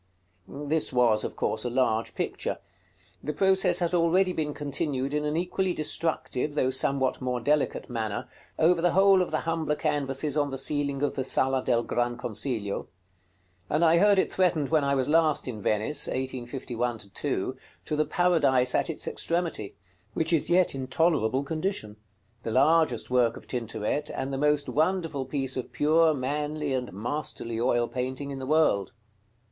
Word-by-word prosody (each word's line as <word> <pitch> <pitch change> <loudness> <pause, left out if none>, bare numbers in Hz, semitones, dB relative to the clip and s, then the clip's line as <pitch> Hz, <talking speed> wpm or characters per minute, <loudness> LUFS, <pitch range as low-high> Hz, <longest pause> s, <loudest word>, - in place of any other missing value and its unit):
This 150 +2 -2
was, 120 -4 +3
of - - -4
course, 110 - -1
a 125 - -1
large 120 -3 0
picture. - - -3 0.7
The 150 - -2
process 190 -1 +3
has 175 -1 0
already 180 +2 +3
been 155 -3 -2
continued 145 -2 -2
in 150 0 0
an 150 +1 -1
equally 180 +1 -1
destructive, 150 -3 -1
though 130 -3 +2
somewhat 130 0 0
more 125 -1 -1
delicate 145 +5 0
manner, 110 -4 -3 0.3
over 165 +1 +3
the 175 0 +2
whole 195 0 +5
of 180 - -1
the 155 - -1
humbler 165 -2 -1
canvases 145 -1 -1
on 145 -1 +1
the 135 - -4
ceiling 140 0 -1
of 145 - +1
the 130 - -2
Sala 130 0 +1
del 120 -2 +2
Gran 120 0 -1
Consiglio; 110 -3 -3 0.8
and 160 +3 +2
I 165 +1 +5
heard 205 +1 +5
it - - +1
threatened 170 -6 +1
when 155 -2 +3
I 140 0 +1
was 130 -2 0
last 155 -2 +2
in 110 -4 -5
Venice 110 +9 -1
(1851 125 -2 -3 0.2
2) - - -2 0.3
to 150 - -2
the 155 - +2
"Paradise" 145 -8 +2
at - - +1
its - - -4
extremity, 170 - -2 0.4
which 160 +1 +1
is 160 - +2
yet 180 +1 +3
in 135 -1 -5
tolerable 135 -4 +1
condition, 155 - -3 0.4
the - - -4
largest 130 -1 +3
work 120 -2 +2
of - - -13
Tintoret, 115 +4 -3
and 135 +1 -4
the - - -1
most 150 0 +2
wonderful 160 -3 0
piece 135 -1 -2
of 130 - -5
pure, 160 +2 +4
manly, 145 +2 -2
and 125 -1 -2
masterly 115 +1 -4
oil 120 0 +2
painting 130 +3 -4
in 135 - -5
the 130 - -6
world. 150 - +2
140 Hz, 170 wpm, -27 LUFS, 125-160 Hz, 0.8 s, whole